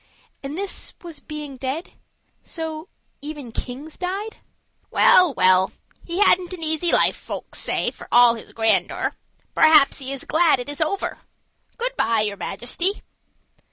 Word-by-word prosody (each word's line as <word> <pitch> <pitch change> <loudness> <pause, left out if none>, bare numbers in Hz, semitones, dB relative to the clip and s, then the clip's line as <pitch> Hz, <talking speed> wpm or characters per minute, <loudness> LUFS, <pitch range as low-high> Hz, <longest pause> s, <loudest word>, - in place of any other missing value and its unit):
And 280 +3 -6
this 400 0 -4
was 335 -4 -9
being 300 -3 -8
dead? 270 +6 -4 0.5
So 320 +2 -6 0.3
even 290 -4 -8
kings 265 +7 -7
died? 390 +4 -4 0.5
"Well, 365 -3 +5
well, 185 +1 +3 0.3
he 340 0 -5
hadn't 370 -2 +4
an 345 -3 -6
easy 315 +2 +2
life, - - +4
folk - - -8
say, - - 0
for - - -13
all 240 -1 +6
his 230 - -10
grandeur. 225 -1 +1 0.4
Perhaps 310 -3 +5
he 265 0 -5
is 275 -2 -4
glad 320 -4 +3
it 245 - -5
is 290 +2 -3
over. 380 +6 -2 0.6
Good - - -2
by, 225 -1 +2
your 205 -1 -1
Majesty." 345 - -2
305 Hz, 145 wpm, -22 LUFS, 250-345 Hz, 0.6 s, all